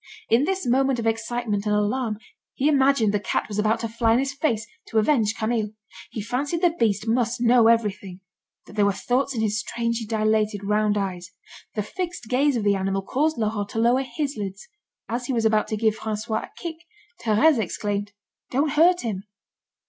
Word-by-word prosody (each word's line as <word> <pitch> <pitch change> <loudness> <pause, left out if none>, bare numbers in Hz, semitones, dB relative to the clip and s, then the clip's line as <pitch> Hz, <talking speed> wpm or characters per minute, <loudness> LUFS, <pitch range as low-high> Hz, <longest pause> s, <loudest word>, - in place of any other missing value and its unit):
In 240 +5 +4
this 385 +2 -1
moment 265 +1 +2
of 230 - -3
excitement 225 -2 -1
and 210 - +2
alarm, 215 +1 0 0.4
he 275 - +1
imagined 270 -7 +3
the 210 - +2
cat - - -1
was 210 -1 -4
about 220 +2 +1
to 230 - -1
fly 225 0 +1
in - - +4
his 270 +1 -1
face 240 -7 0 0.2
to 225 - -2
avenge 220 -2 +3
Camille. 220 -2 -1 0.4
He 215 - -5
fancied 285 - -2
the 350 - +5
beast 220 - 0
must 235 +1 +1
know 240 -1 +5
everything, 205 -5 +1 0.5
that - - -14
there 205 -1 +2
were 200 - +2
thoughts 260 +6 -1
in 225 - -1
his 215 -1 0
strangely 230 0 -2
dilated 215 -1 +1
round 210 +1 +1
eyes. 185 -3 -3 0.5
The 210 - 0
fixed 345 - -5
gaze 275 +2 +2
of 220 - -2
the 205 -1 +3
animal 195 0 -1
caused 300 +9 0
Laurent 210 -2 -1
to 225 - -3
lower 240 +3 +3
his 280 0 -3
lids. 195 +5 -6 0.4
As 245 +2 -3
he 265 - -1
was 230 -2 0
about 215 -1 +3
to 215 - -2
give 220 0 +2
François 220 0 -3
a - - -20
kick, 335 -2 -5 0.5
Thérèse 240 +6 +4
exclaimed: 205 +1 -3 0.4
"Don't 280 +4 +1
hurt 345 +4 +4
him." 200 -4 -4
225 Hz, 195 wpm, -24 LUFS, 210-255 Hz, 0.5 s, the